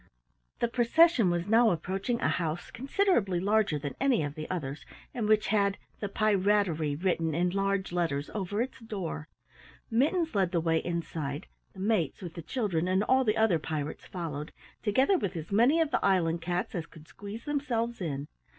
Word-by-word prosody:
The 235 Hz, -, +3 dB
procession 245 Hz, -, +4 dB
was 175 Hz, 0 st, 0 dB
now 225 Hz, +2 st, +5 dB
approaching 195 Hz, +7 st, -2 dB
a -, -, +2 dB
house 165 Hz, 0 st, -2 dB
considerably 250 Hz, -, +1 dB
larger 205 Hz, -3 st, +2 dB
than 145 Hz, 0 st, -4 dB
any 265 Hz, -, +3 dB
of 145 Hz, -1 st, -3 dB
the 155 Hz, 0 st, -7 dB
others 145 Hz, -6 st, -4 dB, 0.3 s
and 225 Hz, -3 st, -2 dB
which 215 Hz, -1 st, +3 dB
had 200 Hz, -1 st, +2 dB, 0.2 s
"The 205 Hz, -, -3 dB
Pirattery" 200 Hz, -7 st, +2 dB
written 165 Hz, -2 st, 0 dB
in 175 Hz, +1 st, +1 dB
large 195 Hz, 0 st, 0 dB
letters 165 Hz, -5 st, -1 dB
over 205 Hz, +2 st, -1 dB
its 260 Hz, -, -8 dB
door. 195 Hz, -9 st, -5 dB, 0.6 s
Mittens 315 Hz, +8 st, +2 dB
led 190 Hz, -3 st, +1 dB
the 170 Hz, -, +3 dB
way 165 Hz, 0 st, +2 dB
inside, 160 Hz, -3 st, -4 dB, 0.3 s
the 190 Hz, -, -9 dB
mates 195 Hz, -8 st, +1 dB
with 170 Hz, -2 st, -6 dB
the 170 Hz, -, -7 dB
children 180 Hz, -, -1 dB
and 190 Hz, +2 st, +2 dB
all 260 Hz, +3 st, +3 dB
the 220 Hz, -2 st, +1 dB
other 220 Hz, -7 st, +3 dB
pirates 155 Hz, -1 st, -4 dB
followed, 155 Hz, -4 st, -5 dB, 0.3 s
together 265 Hz, -, +3 dB
with 195 Hz, -, -3 dB
as 165 Hz, +1 st, -6 dB
many 240 Hz, +10 st, +4 dB
of 320 Hz, -2 st, +1 dB
the -, -, 0 dB
island 170 Hz, -4 st, +2 dB
cats 175 Hz, +2 st, -2 dB
as 170 Hz, -3 st, -4 dB
could 160 Hz, 0 st, -15 dB
squeeze 205 Hz, +3 st, -9 dB
themselves 240 Hz, -6 st, -1 dB
in. 145 Hz, -4 st, -3 dB
195 Hz, 180 wpm, -29 LUFS, 165-225 Hz, 0.6 s, now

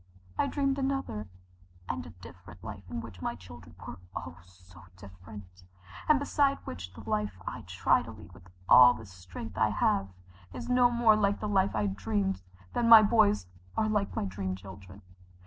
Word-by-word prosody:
I -, -, +1 dB
dreamed 275 Hz, -1 st, 0 dB
another 265 Hz, -, -2 dB, 0.6 s
and 85 Hz, -1 st, -3 dB
a -, -, -10 dB
different 90 Hz, +1 st, -14 dB
life 100 Hz, -4 st, -9 dB
in 120 Hz, -1 st, -4 dB
which 90 Hz, -7 st, -11 dB
my -, -, -2 dB
children 85 Hz, -1 st, -13 dB
were 90 Hz, -, -8 dB, 0.2 s
oh, 85 Hz, 0 st, -6 dB
so 90 Hz, 0 st, -18 dB, 0.2 s
different, 95 Hz, 0 st, -13 dB, 0.5 s
and 305 Hz, -, +7 dB
beside 280 Hz, 0 st, +1 dB
which 90 Hz, +2 st, -7 dB
the -, -, -12 dB
life 105 Hz, -3 st, -1 dB
I -, -, -5 dB
try -, -, +2 dB
to -, -, -10 dB
lead -, -, -12 dB
with 90 Hz, +1 st, -17 dB, 0.2 s
all 125 Hz, -1 st, +8 dB
the 110 Hz, -, -10 dB
strength 90 Hz, -1 st, -9 dB
I -, -, +4 dB
have 95 Hz, -, +1 dB, 0.5 s
is -, -, -6 dB
no 250 Hz, -1 st, +4 dB
more 235 Hz, -2 st, +4 dB
like 205 Hz, -1 st, +1 dB
the 210 Hz, -, -3 dB
life 195 Hz, -, +1 dB
I 105 Hz, -1 st, +1 dB
dreamed 95 Hz, -1 st, -1 dB, 0.3 s
than 235 Hz, -1 st, +1 dB
my 225 Hz, -2 st, +11 dB
boys 210 Hz, -, +3 dB, 0.3 s
are 220 Hz, -, +2 dB
like 210 Hz, -2 st, -1 dB
my -, -, -1 dB
dream 95 Hz, 0 st, -3 dB
children. 95 Hz, +1 st, -12 dB
100 Hz, 180 wpm, -29 LUFS, -, 0.6 s, my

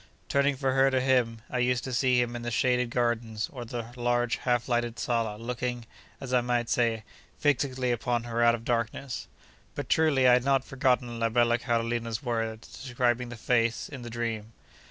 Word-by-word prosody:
Turning 140 Hz, 0 st, +2 dB
from 135 Hz, -1 st, 0 dB
her 135 Hz, 0 st, +4 dB
to 130 Hz, -1 st, +1 dB
him, 125 Hz, -4 st, +1 dB
I 125 Hz, -, -2 dB
used 125 Hz, 0 st, +1 dB
to 130 Hz, -, -4 dB
see 125 Hz, 0 st, +3 dB
him 120 Hz, 0 st, 0 dB
in 120 Hz, -, -5 dB
the 120 Hz, -, -3 dB
shaded 125 Hz, +1 st, +1 dB
gardens, 115 Hz, -3 st, -1 dB
or 125 Hz, -3 st, -6 dB
the 120 Hz, 0 st, -6 dB
large 120 Hz, 0 st, +1 dB
half 120 Hz, -2 st, 0 dB
lighted 120 Hz, -1 st, 0 dB
sala, 115 Hz, -3 st, -1 dB
looking, 120 Hz, +1 st, -4 dB, 0.3 s
as 130 Hz, -2 st, -6 dB
I 125 Hz, -, +4 dB
might 120 Hz, -1 st, 0 dB
say, 115 Hz, -2 st, +1 dB, 0.3 s
'fixedly 130 Hz, -3 st, +1 dB
upon 120 Hz, 0 st, -1 dB
her 120 Hz, 0 st, -2 dB
out 120 Hz, 0 st, +5 dB
of 115 Hz, 0 st, -10 dB
darkness.' 120 Hz, +2 st, -2 dB, 0.5 s
But, -, -, -5 dB
truly, 145 Hz, -5 st, +4 dB
I 125 Hz, -, +7 dB
had 125 Hz, 0 st, +4 dB
not 135 Hz, -1 st, +2 dB
forgotten 125 Hz, -3 st, 0 dB
la 115 Hz, 0 st, +1 dB
bella 120 Hz, +1 st, +3 dB
Carolina's 115 Hz, -1 st, -1 dB
words 115 Hz, -2 st, -4 dB
describing 125 Hz, -2 st, 0 dB
the 120 Hz, -, -7 dB
face 115 Hz, 0 st, 0 dB
in 140 Hz, -3 st, -8 dB
the 120 Hz, -, -7 dB
dream. 115 Hz, -2 st, -4 dB
120 Hz, 190 wpm, -28 LUFS, 115-125 Hz, 0.5 s, I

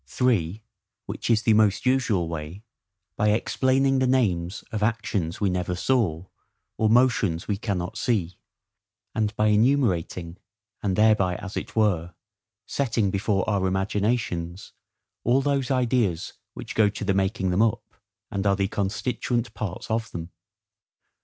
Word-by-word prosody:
(3) 105 Hz, -, 0 dB, 0.4 s
Which -, -, -5 dB
is 115 Hz, -1 st, +3 dB
the 110 Hz, -, +4 dB
most 105 Hz, 0 st, +3 dB
usual 120 Hz, -9 st, +2 dB
way, 80 Hz, +5 st, -6 dB, 0.5 s
by 105 Hz, -, +1 dB
EXPLAINING 130 Hz, +5 st, +2 dB
THE 130 Hz, -, +2 dB
NAMES 95 Hz, -9 st, 0 dB
of 110 Hz, -2 st, -3 dB
actions 105 Hz, -6 st, -1 dB
we 100 Hz, -3 st, +1 dB
never 90 Hz, 0 st, -1 dB
saw, 95 Hz, -6 st, 0 dB, 0.5 s
or 110 Hz, -, +2 dB
motions 115 Hz, -8 st, +2 dB
we 105 Hz, -, 0 dB
cannot 95 Hz, -4 st, -3 dB
see; 95 Hz, -7 st, -1 dB, 0.7 s
and 110 Hz, -1 st, -1 dB
by 105 Hz, 0 st, +2 dB
enumerating, 105 Hz, -7 st, +1 dB, 0.4 s
and 95 Hz, -3 st, 0 dB
thereby, 105 Hz, -4 st, +3 dB
as 105 Hz, 0 st, -7 dB
it -, -, -5 dB
were, 90 Hz, -6 st, +1 dB, 0.5 s
setting 115 Hz, -7 st, 0 dB
before 100 Hz, -1 st, 0 dB
our 100 Hz, -3 st, +1 dB
imaginations 95 Hz, -2 st, -1 dB, 0.5 s
all 125 Hz, +3 st, +3 dB
those 140 Hz, -2 st, 0 dB
ideas 120 Hz, -9 st, +1 dB, 0.2 s
which -, -, -7 dB
go 105 Hz, -2 st, +4 dB
to 100 Hz, +1 st, -6 dB
the 100 Hz, -, +2 dB
making 95 Hz, 0 st, 0 dB
them 90 Hz, +4 st, +2 dB
up, 115 Hz, -2 st, 0 dB, 0.4 s
and 100 Hz, 0 st, -1 dB
are 100 Hz, -, +4 dB
the 100 Hz, -1 st, 0 dB
constituent 120 Hz, +4 st, -2 dB
parts 100 Hz, 0 st, -5 dB
of 115 Hz, +1 st, -1 dB
them. 85 Hz, +1 st, -7 dB
105 Hz, 140 wpm, -25 LUFS, 90-115 Hz, 0.7 s, the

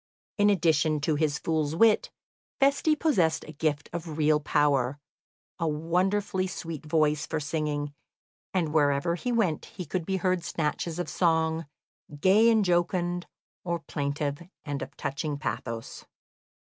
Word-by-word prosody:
In 205 Hz, 0 st, +5 dB
addition 160 Hz, -5 st, +2 dB
to 155 Hz, +2 st, +1 dB
his 150 Hz, -1 st, +1 dB
fool's 155 Hz, -1 st, -1 dB
wit, 220 Hz, +4 st, +4 dB, 0.5 s
Feste 280 Hz, +3 st, +3 dB
possessed 175 Hz, -, +2 dB
a -, -, -7 dB
gift 145 Hz, -1 st, -1 dB
of 165 Hz, -2 st, -5 dB
real 155 Hz, -1 st, +3 dB
power, 145 Hz, -3 st, +1 dB, 0.6 s
a 165 Hz, -, 0 dB
wonderfully 185 Hz, +5 st, 0 dB
sweet 165 Hz, -5 st, -6 dB
voice 150 Hz, -1 st, +2 dB
for 160 Hz, -, -2 dB
singing, 145 Hz, -1 st, -2 dB, 0.6 s
and 165 Hz, -5 st, 0 dB
wherever 145 Hz, +1 st, +2 dB
he 245 Hz, +8 st, -2 dB
went 200 Hz, -10 st, 0 dB, 0.2 s
could 175 Hz, -1 st, -2 dB
be 190 Hz, -1 st, 0 dB
heard 185 Hz, -1 st, 0 dB
snatches 160 Hz, +1 st, -2 dB
of 175 Hz, -, -2 dB
song, 160 Hz, -2 st, +1 dB, 0.5 s
gay 205 Hz, +7 st, +5 dB
and 220 Hz, -3 st, +4 dB
jocund, 175 Hz, 0 st, 0 dB, 0.4 s
or 170 Hz, -1 st, -1 dB
plaintive 145 Hz, -2 st, -3 dB, 0.2 s
and 145 Hz, -2 st, -3 dB
of -, -, -7 dB
touching 140 Hz, +1 st, -3 dB
pathos. 115 Hz, -6 st, -5 dB
160 Hz, 135 wpm, -28 LUFS, 150-180 Hz, 0.6 s, In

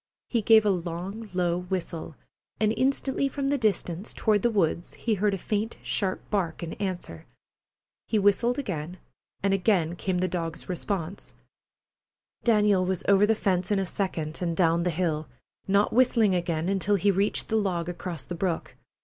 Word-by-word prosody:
He 235 Hz, -, +1 dB
gave 220 Hz, 0 st, +6 dB
a 205 Hz, -, +4 dB
long, 185 Hz, +5 st, -4 dB
low 175 Hz, -1 st, +1 dB
whistle, 180 Hz, -3 st, -4 dB, 0.4 s
and 215 Hz, 0 st, +2 dB
instantly 270 Hz, +2 st, +1 dB
from 275 Hz, 0 st, -2 dB
the 285 Hz, -, +2 dB
distance, 200 Hz, -4 st, 0 dB
toward 210 Hz, -2 st, +2 dB
the 240 Hz, -, +3 dB
woods, 175 Hz, -5 st, 0 dB
he 230 Hz, -, -1 dB
heard 205 Hz, 0 st, +1 dB
a -, -, -4 dB
faint, 210 Hz, +4 st, -2 dB
sharp 190 Hz, -2 st, -1 dB
bark 175 Hz, -6 st, -1 dB
in 165 Hz, -, -4 dB
answer. 180 Hz, -, -4 dB, 0.8 s
He 220 Hz, -, +1 dB
whistled 205 Hz, +5 st, +3 dB
again, 180 Hz, -, -4 dB, 0.5 s
and 195 Hz, -1 st, +3 dB
again 180 Hz, -4 st, +2 dB
came 185 Hz, +1 st, -1 dB
the 185 Hz, +1 st, +1 dB
dog's 165 Hz, -3 st, -4 dB
response. 185 Hz, 0 st, -4 dB, 1.1 s
Daniel 210 Hz, -4 st, +4 dB
was 185 Hz, -1 st, -1 dB
over 200 Hz, +1 st, +5 dB
the 225 Hz, -, +3 dB
fence 185 Hz, -4 st, 0 dB
in 205 Hz, -, +2 dB
a 195 Hz, -, 0 dB
second 165 Hz, -5 st, -3 dB
and 170 Hz, -2 st, -1 dB
down 170 Hz, -1 st, +3 dB
the 180 Hz, -, +1 dB
hill, 160 Hz, -2 st, -1 dB, 0.4 s
not 200 Hz, +2 st, +3 dB
whistling 230 Hz, -4 st, +4 dB
again 170 Hz, -2 st, -1 dB
until 195 Hz, +1 st, +1 dB
he 200 Hz, +1 st, +3 dB
reached 195 Hz, +2 st, 0 dB
the 220 Hz, -, +1 dB
log 185 Hz, -6 st, 0 dB
across 175 Hz, -3 st, -5 dB
the -, -, -5 dB
brook. 175 Hz, -1 st, -2 dB
190 Hz, 170 wpm, -27 LUFS, 175-210 Hz, 1.1 s, gave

